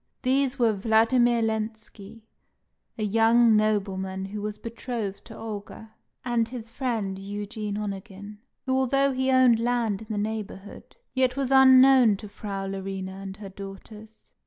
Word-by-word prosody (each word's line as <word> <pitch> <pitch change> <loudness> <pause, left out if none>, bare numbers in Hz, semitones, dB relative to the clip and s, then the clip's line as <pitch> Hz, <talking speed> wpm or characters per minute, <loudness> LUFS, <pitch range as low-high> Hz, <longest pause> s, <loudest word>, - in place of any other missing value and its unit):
These 270 +1 +1
were 235 -4 +3
Vladimir 230 +3 +3
Lenski, 220 -1 -5 0.7
a 215 - -3
young 225 +2 +4
nobleman 195 -3 -1
who 205 +2 -6
was 210 0 -4
betrothed 230 -3 -5
to 225 - -11
Olga, 215 0 -8 0.3
and 235 -2 +1
his 230 -2 -8
friend, 225 -7 -3
Eugene 205 +1 -5
Onegin, 205 0 -7 0.3
who, 260 0 0
although 275 +1 +2
he 260 0 -1
owned 255 -3 +5
land 230 -4 0
in 220 - -11
the 215 - -3
neighbourhood, 205 -2 -6 0.2
yet 260 0 +1
was 270 -1 -1
unknown 260 -4 +7
to 210 - -9
Frau 200 -1 -6
Larina 195 0 -5
and 195 0 -8
her 205 -2 -9
daughters. 200 +3 -12
220 Hz, 140 wpm, -26 LUFS, 200-240 Hz, 0.7 s, unknown